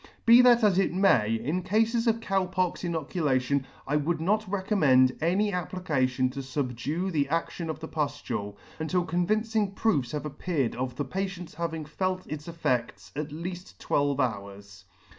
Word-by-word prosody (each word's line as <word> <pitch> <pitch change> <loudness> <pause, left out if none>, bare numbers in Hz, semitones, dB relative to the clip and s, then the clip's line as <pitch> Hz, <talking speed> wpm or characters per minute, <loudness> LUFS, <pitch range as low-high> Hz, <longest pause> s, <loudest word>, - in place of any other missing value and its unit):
Be 235 +2 +9
that 245 -2 +6
as 195 -3 +4
it 195 - +2
may, 125 - +3
in 145 +11 -2
Cafes 225 +5 +1
of 230 0 +2
Cow 195 -4 0
pox 185 -1 -1
inoculation, 140 -5 0 0.2
I 145 +2 +1
would 160 +3 0
not 210 +5 0
recommend 150 - +3
any 195 +5 +1
application 140 -8 0
to 140 - -6
fubdue 135 +6 -2
the 145 -4 +1
adtion.of 165 0 -2
the 160 - -6
puftule, 145 -10 -3 0.2
until 175 +3 0
convincing 210 +4 0
proofs 150 - 0
had 150 0 -3
appeared 150 -3 -2
of 125 0 -3
the 145 - -2
patient's 185 +2 -4
having 160 -1 -3
felt 185 +4 -2
its 150 +1 -7
effects 130 -8 -2
at 150 +1 -4
leaf!: 175 +4 -7
twelve 145 -1 0
hours. 100 -5 -4
160 Hz, 155 wpm, -27 LUFS, 135-185 Hz, 0.2 s, Be